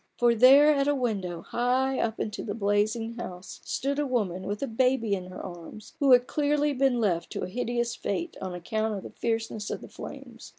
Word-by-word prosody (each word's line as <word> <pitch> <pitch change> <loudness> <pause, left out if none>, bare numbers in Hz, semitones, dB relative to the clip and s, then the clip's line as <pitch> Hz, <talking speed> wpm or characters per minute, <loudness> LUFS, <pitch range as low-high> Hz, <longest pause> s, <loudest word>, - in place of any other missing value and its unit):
For 240 -1 +4
there 275 +6 +7
at 280 -1 +1
a 290 - +3
window 195 -10 -2
high 255 +2 0
up 220 -1 -1
in 215 - -2
the 205 0 -5
blazing 215 +2 0
house, 180 -5 -8
stood 280 +2 -2
a 295 - 0
woman 195 -8 -1
with 205 +5 -3
a - - -1
baby 245 -2 +1
in 185 -2 -3
her 185 - -9
arms, 175 - -10
who 280 -3 +4
had 245 0 +6
clearly 295 +1 +1
been 265 -2 +2
left 180 -7 0
to - - -3
a - - -2
hideous 240 +3 -2
fate 335 - -3
on 185 -2 -4
account 215 +5 -2
of 195 - -6
the - - -9
fierceness 225 -2 -2
of - - -4
the - - -10
flames. - - -10
230 Hz, 210 wpm, -27 LUFS, 205-260 Hz, -, there